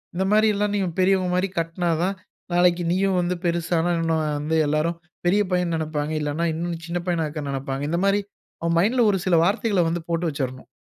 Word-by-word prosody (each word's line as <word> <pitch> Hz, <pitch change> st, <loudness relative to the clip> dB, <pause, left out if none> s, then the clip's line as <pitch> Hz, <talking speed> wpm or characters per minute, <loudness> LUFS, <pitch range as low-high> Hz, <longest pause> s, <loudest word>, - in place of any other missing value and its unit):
இந்த 190 Hz, -, 0 dB
மாரில்லாம், 210 Hz, -1 st, +3 dB
நீங்க 195 Hz, -3 st, 0 dB
பெரியவங்க 185 Hz, -1 st, +3 dB
மாரி 185 Hz, +2 st, +1 dB
கட்டினாதான், 170 Hz, +2 st, -1 dB, 0.4 s
நாளைக்கு 175 Hz, 0 st, +3 dB
நீயும் 190 Hz, +1 st, +1 dB
வந்து 175 Hz, +1 st, -1 dB
பெரிசானா 170 Hz, 0 st, +1 dB
இன்னும் 165 Hz, -1 st, +1 dB, 0.2 s
வந்து, 155 Hz, +2 st, 0 dB
எல்லாரும் 155 Hz, +3 st, 0 dB, 0.3 s
பெரிய 200 Hz, +4 st, +4 dB
பையன்னு 180 Hz, -2 st, +1 dB
நெனைப்பாங்க. 155 Hz, -1 st, -2 dB
இல்லன்னா, 150 Hz, +3 st, -1 dB
இன்னும் 170 Hz, 0 st, -4 dB
சின்ன 175 Hz, +1 st, -2 dB
பையனா 170 Hz, -3 st, +1 dB
இருக்க 150 Hz, -1 st, -5 dB
நெனைப்பாங்க. 135 Hz, 0 st, -3 dB
இந்த 170 Hz, -, +1 dB
மாரி 200 Hz, +1 st, +3 dB, 0.4 s
அவன் 170 Hz, 0 st, +1 dB
மைண்டுல 235 Hz, +7 st, +3 dB
ஒரு 195 Hz, -, 0 dB
சில 180 Hz, -, +4 dB
வார்த்தைகள 200 Hz, -1 st, +1 dB
வந்து, 170 Hz, 0 st, -3 dB
போட்டு 170 Hz, +1 st, 0 dB
வச்சுறணும். 130 Hz, -4 st, -4 dB
170 Hz, 180 wpm, -23 LUFS, 160-185 Hz, 0.4 s, பெரிய